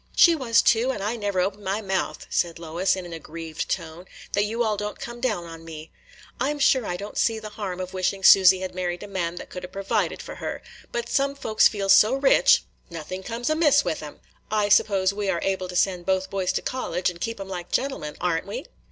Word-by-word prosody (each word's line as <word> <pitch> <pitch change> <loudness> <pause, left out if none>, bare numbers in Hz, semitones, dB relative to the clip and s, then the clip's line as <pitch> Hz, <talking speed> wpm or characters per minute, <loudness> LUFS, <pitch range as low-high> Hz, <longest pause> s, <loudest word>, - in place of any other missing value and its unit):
"She 340 - +7
was, 240 -6 +3
too; 240 +3 +3
and 195 - -5
I 215 +3 -1
never 205 -4 -2
open 200 +2 -2
my 195 +2 -1
mouth," 190 -3 -2
said 170 -1 0
Lois, 170 +3 0
in 185 -1 -6
an 175 - -8
aggrieved 165 0 -6
tone, 165 0 -4 0.3
"that 205 +1 +2
you 230 +3 -1
all 215 -2 +1
don't 210 0 -5
come 240 0 -7
down 215 -9 0
on 165 -1 -10
me. 160 -1 -9 0.5
I 265 +3 +1
'm 295 - -2
sure 260 -4 +3
I 175 - -2
don't 205 +3 -6
see 225 -1 +2
the 215 -1 -7
harm 200 -4 -5
of 185 0 -5
wishing 190 +1 -1
Susy 190 -1 +7
had 185 - -4
married 180 -1 -3
a - - -7
man 175 -4 -3
that - - -9
could 180 - -7
'a' - - -5
provided 195 +1 -1
for - - -8
her; - - -5 0.3
but 235 0 -3
some 275 +2 0
folks 225 -6 +3
feel 200 -2 -3
so 210 +5 +6
rich, 270 0 +5 0.3
nothing 170 +3 -6
comes 235 +4 -5
amiss 295 -2 +4
with - - -2
'em. - - -10 0.3
I 210 -1 +1
suppose 195 -2 +3
we 200 -1 -2
are 175 -3 0
able 190 -1 -1
to 180 - -8
send 180 -1 +1
both 190 0 0
boys 190 -2 0
to - - -2
college, 190 -8 -1
and 170 -1 -14
keep 230 0 -3
'em 195 - -6
like 180 -2 -6
gentlemen, 260 - -2
are 175 -2 +1
n't - - -14
we?" - - -5
195 Hz, 235 wpm, -24 LUFS, 180-225 Hz, 0.5 s, She